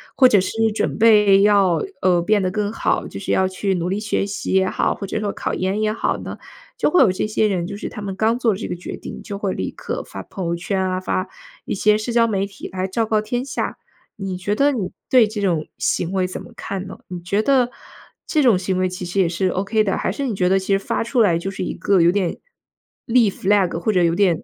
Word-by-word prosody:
或 260 - +7
者 205 -6 +4
是 225 +4 0
准 - - -1
备 210 -3 +6
要， 200 -4 +4 0.2
呃， 180 -2 +3
变 210 +2 +2
得 185 - 0
更 205 +2 -2
好， - - 0
就 - - -8
是 200 - -3
要 190 - +3
去 190 +1 -1
努 175 -1 -2
力 195 +3 -1
学 210 -2 -1
习 200 0 -4
也 190 0 +3
好， - - 0
或 200 - -6
者 200 - -3
说 210 -1 -2
考 - - -4
研 190 +3 -1
也 215 0 +1
好 230 - -1
呢， - - -7 0.4
就 - - +1
会 360 - +4
有 190 - +4
这 185 - -2
些 215 0 +1
人， 180 -4 -1
就 200 +1 -6
是 - - -5
他 - - -8
们 195 -2 -4
刚 220 +4 +1
做 235 -3 +3
了 - - -5
这 - - -4
个 - - -3
决 175 - -7
定 - - -8
就 200 - -6
会 200 -2 -2
立 95 - -3
刻 - - -5
发 95 - -8
朋 185 - -5
友 170 - 0
圈 190 +3 -2
啊， 185 0 -1
发 185 0 -2 0.4
一 - - -2
些 210 +2 +3
社 215 +3 -3
交 230 0 +4
媒 200 -3 0
体 200 - -9
来 185 0 -3
昭 225 +4 0
告 215 -1 +1
天 240 +4 -3
下。 260 - -3 0.4
你 195 -2 -4
觉 200 +3 -1
得 285 +5 +3
你 215 -9 -3 0.2
对 245 -4 +5
这 210 0 -5
种 170 -6 0
行 175 - 0
为 190 -1 +1
怎 185 - -6
么 - - -12
看 195 -1 -5
呢？ 190 - -9
你 180 -1 -6
觉 200 +5 0
得 255 -1 +3 0.6
这 310 - +1
种 240 -8 +5
行 185 0 -1
为 185 0 +1
其 180 0 -6
实 180 +3 -2
也 175 - +2
是 185 +2 0
OK 200 +4 +1
的， 195 -2 0
还 - - -1
是 280 - -3
你 245 - -1
觉 180 -1 +1
得 190 - +4
其 190 +1 0
实 195 - +3
发 195 - -2
出 235 +1 +1
来 180 -6 +4
就 185 +3 -4
是 195 - -4
一 - - -3
个 195 -3 +2
有 170 +1 +5
点， 185 -3 -1 0.7
立 235 -3 +4
flag， 190 -3 +1
或 215 +5 0
者 180 -2 +3
有 165 -1 +3
点， 175 -3 +2
195 Hz, 290 characters per minute, -21 LUFS, 185-215 Hz, 0.7 s, 或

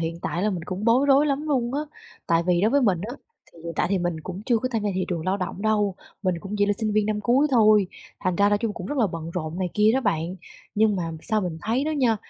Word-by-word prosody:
hiện 165 0 -3
tại 170 +4 -2
là 215 - +2
mình 175 -4 -4
cũng 185 +3 -5
bối 245 +5 +4
rối 280 +1 +5
lắm 280 0 0
luôn 255 -4 0
á. 290 - 0 0.5
Tại 165 0 +3
vì 175 -1 +3
đối 210 +4 +3
với 285 +1 +3
mình 190 -7 +2
á, 215 +6 -5 0.4
thì - - -17
hiện 170 - -4
tại - - +2
thì 195 - +2
mình 175 -2 -2
cũng 185 +4 -7
chưa 240 -3 +3
có 255 - -2
tham 225 - 0
gia 210 - 0
thị 185 0 0
trường 170 -3 -3
lao 190 +1 +1
động 195 0 -5
đâu, 210 -3 +1 0.3
mình 185 -2 +1
cũng 200 +3 -6
chỉ 205 - +3
là 205 - +2
sinh 220 -2 -1
viên 210 0 +2
năm 215 -1 -1
cuối 250 +6 +3
thôi, 215 -5 +5 0.3
thành 185 -1 0
ra 200 +2 +4
nói 205 0 +2
chung 225 -1 -2
cũng 180 - -6
rất 290 - -3
là 230 - +4
bận 165 -3 -6
rộn 165 -1 -4
này 185 -1 -1
kia 210 0 +4
đó 265 - +2
bạn. 170 -5 -1 0.4
Nhưng 210 -1 +3
mà 170 -3 -2
sao 215 -1 0
mình 175 -4 -4
thấy 240 +6 0
đó 310 - -1
nha, 255 -7 +2
205 Hz, 295 wpm, -24 LUFS, 180-230 Hz, 0.5 s, rối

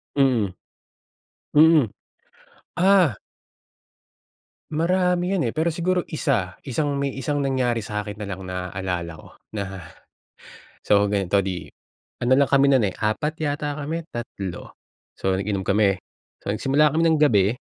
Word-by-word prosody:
Mm. 120 -9 +2 1.0
Mm. 155 -7 +6 0.9
Ah! 180 - +4 1.5
Marami 180 +3 +1
'yon 190 -4 +1
eh, - - -3
pero 160 +2 +1
siguro 180 +2 0
isa. 120 - -1
Isang 140 +2 -1
may 140 -1 -2
isang 145 +2 -2
nangyari 130 -4 0
sa 105 0 -4
akin 105 0 -8
na 105 - -5
lang 95 -1 -6
naalala 90 -1 -4
ko 80 - -14 0.3
na. 100 -2 -4 1.0
So 100 0 +3
ganito, 100 -1 +1
'di 90 -3 -4 0.6
ano 125 - +3
lang 140 - +3
kami 140 0 +4
nun, 130 -5 +4
eh, - - -5
4 110 +9 -1
yata 145 0 -2
kami, 150 +3 -3
3. 100 - -6 0.4
So 95 0 -1
nag-inom 100 0 -2
kami. 100 0 +3 0.4
So - - -9
nagsimula 135 +8 +3
kami 160 +2 +1
ng 160 -1 +3
gabi, 105 -8 +4
125 Hz, 135 wpm, -23 LUFS, 100-150 Hz, 1.5 s, Mm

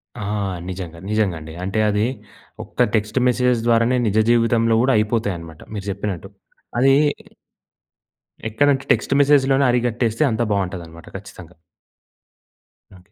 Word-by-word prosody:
ఆ! 120 - -8 0.5
నిజంగా 90 -3 -7
నిజంగా 105 -5 +1
అండి 80 0 -10
అంటే 95 +4 -2
అది 105 +1 +1 0.6
ఒక్క - - 0
టెక్స్ట్ 105 +4 0
మెసేజెస్ 125 -1 +2
ద్వారానే 115 +2 +3
నిజ 105 - 0
జీవితంలో 115 -1 +3
కూడా 135 0 +3
అయిపోతయి 105 -2 0
అన్నమాట. 80 -1 -12
మీరు 100 -2 -5
చెప్పినట్టు 95 -2 -5 0.5
అదీ... 135 +2 +5 1.6
ఎక్కడంటే 140 +4 +2
టెక్స్ట్ - - +1
మెస్సేజ్‌లోనే 140 -1 +4
అరికట్టేస్తే 120 +1 0
అంతా 115 +2 0
బావుంటదన్నమాట 90 -4 -4
ఖచ్చితంగా. 90 -4 -13 1.4
ఓకే. 90 +2 -20
110 Hz, 120 wpm, -21 LUFS, 95-120 Hz, 1.6 s, అదీ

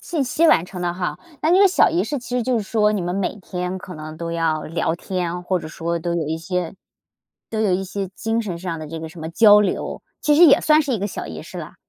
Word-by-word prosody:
信 310 -6 -2
息 320 +6 +2
完 165 - +5
成 180 0 -8
的 175 -1 -1
哈， 180 -1 -3 0.2
那 315 - +2
个 390 +2 +6
小 370 - +4
仪 175 - +1
式 280 +7 -3
其 245 0 -7
实 245 - +1
就 250 0 +1
是 - - -2
说 210 +1 +2
你 205 - -1
们 175 +1 -2
每 195 +1 -2
天 180 -1 -4
可 185 -1 -9
能 155 0 -8
都 170 0 -4
要 165 -2 0
聊 165 0 -1
天， 180 -1 -3
或 185 0 0
者 155 - -8
说 170 +1 -3
都 170 +1 -2
有 165 -3 -1
一 160 +2 -2
些 180 +2 -3 0.8
都 220 - -3
有 210 -4 +2
一 190 +1 0
些 195 0 -4
精 225 +1 -1
神 185 -6 -4
上 170 -2 -4
的 155 - -7
这 165 +1 -6
个 160 - -6
什 170 0 -12
么 160 - -5
交 210 +3 +7
流， 200 -3 -2 0.2
其 295 - +3
实 345 +2 +8
也 - - +6
算 310 0 +5
是 280 -4 -2
一 215 - -1
个 200 - -1
小 - - -6
仪 - - -7
式 - - -10
了。 - - -7
185 Hz, 295 characters per minute, -21 LUFS, 170-220 Hz, 0.8 s, 实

